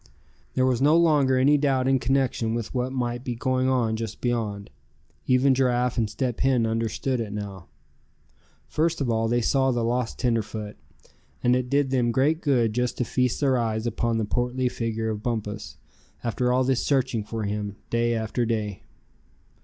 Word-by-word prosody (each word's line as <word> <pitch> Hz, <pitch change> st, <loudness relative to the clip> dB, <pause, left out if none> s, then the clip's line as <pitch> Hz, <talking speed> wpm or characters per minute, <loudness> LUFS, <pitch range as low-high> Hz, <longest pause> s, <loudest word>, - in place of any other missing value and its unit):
There 130 Hz, -, +3 dB
was 130 Hz, -1 st, +1 dB
no 150 Hz, +4 st, +5 dB
longer 145 Hz, -6 st, +4 dB
any 145 Hz, +3 st, +4 dB
doubt 135 Hz, -3 st, +1 dB
in 135 Hz, 0 st, +3 dB
connection 125 Hz, -3 st, 0 dB
with 115 Hz, -2 st, -4 dB
what 125 Hz, 0 st, -1 dB
might 120 Hz, -2 st, -2 dB
be 125 Hz, -3 st, -3 dB
going 130 Hz, +2 st, 0 dB
on 120 Hz, -4 st, +1 dB
just 110 Hz, -1 st, -5 dB
beyond. 110 Hz, -5 st, -2 dB, 0.6 s
Even 130 Hz, +1 st, +4 dB
Giraffe 125 Hz, -1 st, +1 dB
and 110 Hz, -3 st, 0 dB
Step 120 Hz, +3 st, -2 dB
Hen 130 Hz, -3 st, +2 dB
understood 115 Hz, +3 st, -1 dB
it 110 Hz, -2 st, -5 dB
now. 100 Hz, -3 st, -6 dB, 1.0 s
First 165 Hz, +1 st, 0 dB
of 130 Hz, -4 st, 0 dB
all 115 Hz, 0 st, +1 dB
they 120 Hz, +1 st, +1 dB
saw 135 Hz, +3 st, +2 dB
the 120 Hz, -2 st, 0 dB
lost 120 Hz, 0 st, -1 dB
tenderfoot; 110 Hz, -3 st, -2 dB, 0.7 s
and 125 Hz, 0 st, +4 dB
it 125 Hz, -1 st, -1 dB
did 140 Hz, -1 st, +1 dB
them 120 Hz, -3 st, +2 dB
great 145 Hz, +7 st, +2 dB
good 120 Hz, -7 st, +2 dB
just 125 Hz, +1 st, -1 dB
to 125 Hz, -, 0 dB
feast 125 Hz, +3 st, 0 dB
their 135 Hz, -3 st, +3 dB
eyes 110 Hz, -1 st, -1 dB
upon 115 Hz, 0 st, 0 dB
the 110 Hz, -, 0 dB
portly 125 Hz, +3 st, 0 dB
figure 115 Hz, -2 st, -2 dB
of 105 Hz, -1 st, -5 dB
Bumpus, 105 Hz, -, -4 dB, 0.5 s
after 125 Hz, +1 st, 0 dB
all 130 Hz, +1 st, +3 dB
this 130 Hz, -1 st, +1 dB
searching 130 Hz, -5 st, +1 dB
for 110 Hz, +1 st, -4 dB
him, 105 Hz, 0 st, -3 dB, 0.2 s
day 120 Hz, 0 st, +1 dB
after 110 Hz, +2 st, -1 dB
day. 110 Hz, -4 st, -2 dB
120 Hz, 175 wpm, -25 LUFS, 110-130 Hz, 1.0 s, no